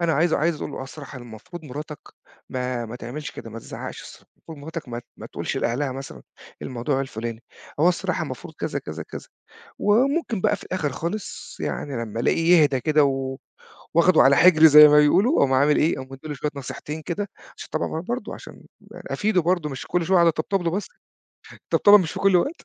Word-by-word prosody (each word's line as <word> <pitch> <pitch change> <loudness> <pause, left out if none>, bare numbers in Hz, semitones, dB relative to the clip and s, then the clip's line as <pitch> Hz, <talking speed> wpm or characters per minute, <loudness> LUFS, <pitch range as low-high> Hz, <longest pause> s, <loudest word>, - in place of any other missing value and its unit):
أنا 170 -1 +1
عايز 160 +3 +2
عايز 160 +1 +1
أقول - - -6
له - - -7
"آه - - -4
الصراحة 140 0 -9
المفروض 120 +8 -11
مراتك 150 +2 -7 0.5
ما 125 -2 -3
ما 115 +2 -7
تعملش 125 +3 -7
كده 115 - -10
ما 115 - -7
تزعقش، - - -9
المفروض 160 -2 -12
مراتك 160 0 -7
ما 120 0 -5 0.2
ما - - -9
تقولش - - -4
لأهلها 130 +3 -1
مثلًا 135 +1 -9 0.4
الموضوع 130 +3 -2
الفلاني، 115 -3 -5 0.4
هو 165 - +5
الصراحة 180 - -1
المفروض - - -8
كذا، - - -3
كذا، - - -7
كذا." - - -10 0.5
وممكن 245 - +1
بقى - - +2
في - - -13
الآخر 160 -7 -2
خالص 175 +9 -6
يعني 145 - -4
لمّا 115 +1 -5
ألاقيه 165 +7 +4
يهدى 140 -3 +2
كده 150 +1 +3
و 135 -1 -1 0.6
وآخده 170 +1 +5
على 135 +1 +6
حجري 160 -2 +7
زيّ 150 0 +10
ما 150 - +5
بيقولوا 195 - +4
أقوم 135 - +3
عامل 145 +3 +4
إيه، 160 - +2
أقوم 130 0 -7
مِدّي 135 +3 -10
له 150 - -4
شوية 145 +2 -3
نصيحتين 140 +3 -6
كده 185 +5 -4 0.3
عشان - - -9
طبعًا 160 - -2
برضو 240 +8 -4
عشان - - -12 0.3
أفيده 205 -3 -1
برضو، 170 -2 0
مش 135 - -7
كل 175 -1 0
شويه 190 +2 +3
أقعد 170 -1 +5
أطبطب 165 +4 0
له 170 -1 -1
بس 200 +4 -3 0.7
الطبطبه 205 0 +5
مش 175 -5 -2
في - - -6
كل 195 -2 +4
وقت 285 - -1
150 Hz, 195 wpm, -23 LUFS, 135-175 Hz, 0.7 s, زيّ